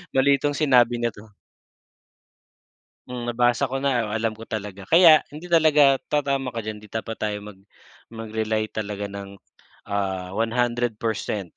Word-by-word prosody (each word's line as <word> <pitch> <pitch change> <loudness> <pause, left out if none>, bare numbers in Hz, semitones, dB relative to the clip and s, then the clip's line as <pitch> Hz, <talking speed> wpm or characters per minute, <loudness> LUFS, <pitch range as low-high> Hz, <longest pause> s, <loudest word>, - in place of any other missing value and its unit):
mali 140 +1 +5
itong 145 - +1
sinabi 125 -5 +4
na 120 - +1
'to. 105 +1 -15 1.8
Hmm, 120 -1 -5
nabasa 120 +2 +1
ko 135 - -2
na, 120 -6 0
alam 115 0 -1
ko 110 +1 -12
talaga. 105 -3 -5
Kaya 165 -3 +7
hindi 150 +4 -10
talaga 150 -5 +4
tatama 140 -3 0
ka 115 -2 -6
diyan 105 -1 -6
hindi 105 - -15
dapat 110 +1 -5
tayo 105 -1 -1
mag 105 -1 -11 0.5
mag-rely 110 -1 -2
talaga 105 -1 -4
ng, 100 0 -8 0.5
ah, 95 -2 -3
100% 115 -3 -1
115 Hz, 140 wpm, -24 LUFS, 105-135 Hz, 1.8 s, Kaya